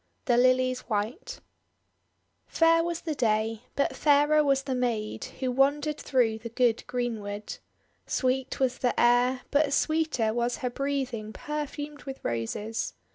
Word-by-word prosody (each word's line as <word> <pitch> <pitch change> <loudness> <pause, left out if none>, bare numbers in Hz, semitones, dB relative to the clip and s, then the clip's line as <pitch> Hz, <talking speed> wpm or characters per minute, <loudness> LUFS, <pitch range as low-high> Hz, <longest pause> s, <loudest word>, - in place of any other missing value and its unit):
THE 245 -5 +3
LILIES 255 +1 +3
WHITE 235 - -3 1.1
FAIR 330 0 +4
was 340 -1 -3
the 320 - -3
day, 220 -3 0
but 280 - 0
fairer 295 +1 +4
was 275 -2 +2
the 270 - -2
maid 235 -4 -2
who 260 -1 -4
wandered 285 +3 +1
through 230 -4 +1
the 230 +1 -7
good 235 -1 +1
greenwood. 215 -4 -4 0.5
Sweet 260 0 -1
was 255 -1 0
the 245 - 0
air, 245 +2 +3
but 285 0 +3
sweeter 310 -10 +1
was 240 +1 -1
her 250 - -1
breathing 260 -5 -3
per 300 0 -4
fumed 295 +1 -8
with 270 -1 -6
Roses. 120 - -3
255 Hz, 140 wpm, -27 LUFS, 230-285 Hz, 1.1 s, FAIR